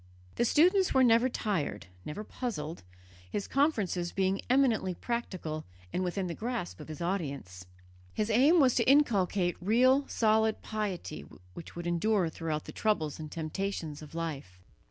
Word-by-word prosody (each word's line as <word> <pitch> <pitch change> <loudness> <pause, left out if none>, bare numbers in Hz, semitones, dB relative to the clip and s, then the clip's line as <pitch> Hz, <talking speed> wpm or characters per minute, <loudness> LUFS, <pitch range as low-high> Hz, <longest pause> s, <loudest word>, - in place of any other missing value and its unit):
The 240 - +1
students 365 - +4
were 265 - +6
never 235 +1 +5
tired, 185 - -2 0.2
never 150 +8 -5
puzzled, 175 - -5 0.5
his 195 - -3
conferences 205 - +1
being 195 0 0
eminently 240 -8 +2
practical 185 -11 -4 0.3
and 185 - 0
within 185 +1 -2
the 175 - -3
grasp 230 -4 -4
of 150 - -9
his 155 +1 -8
audience. 140 - -4 0.4
His 215 - -1
aim 280 +10 +5
was 260 -4 +5
to - - +2
inculcate 200 -10 +3
real 255 +8 +4
solid 220 0 +2
piety 210 - -4 0.3
which 170 - -10
would 170 0 -6
endure 175 +1 +1
throughout 160 -2 -3
the - - -7
troubles 160 -10 -1
and 155 -1 -7
temptations 160 -2 -4
of 155 +2 -11
life. 140 - -5
195 Hz, 150 wpm, -30 LUFS, 165-235 Hz, 0.5 s, were